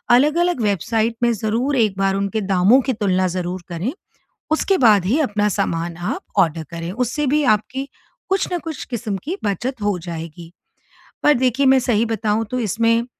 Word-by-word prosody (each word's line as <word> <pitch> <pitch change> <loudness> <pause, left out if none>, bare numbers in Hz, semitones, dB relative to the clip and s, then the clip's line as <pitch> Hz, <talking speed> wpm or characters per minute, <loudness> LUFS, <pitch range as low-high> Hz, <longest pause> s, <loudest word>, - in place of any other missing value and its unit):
अलग-अलग 305 +3 +2
वेबसाइट 220 +3 0
में 235 - +4
ज़रूर 225 +7 -1
एक 215 -5 +1
बार 195 0 +2
उनके 200 +2 -1
दामों 195 +5 +4
की 260 - +2
तुलना 190 -4 +1
ज़रूर 180 0 -3
करें, 175 +8 -3 0.6
उसके 375 +5 +2
बाद 210 -7 +5
ही 240 +11 +2
अपना 210 -5 +1
सामान 170 -2 -2
आप 175 - -3 0.2
ऑर्डर 165 -3 +2
करें 170 +1 -5
उससे 250 +7 -1
भी 300 +3 +2
आपकी 265 +6 -6 0.4
कुछ 385 0 +1
ना 355 - 0
कुछ 315 -2 -6
किस्म 225 -5 -4
की 360 +6 -4
बचत 230 +5 -2
हो 205 -3 +1
जाएगी। 165 0 -7 0.7
पर 295 - +5
देखिए 260 +2 +1
मैं 265 0 +6
सही 235 -3 +1
बताऊँ 215 +1 0
तो 255 - -1
इसमें 230 +2 +1
220 Hz, 175 wpm, -20 LUFS, 190-260 Hz, 0.7 s, मैं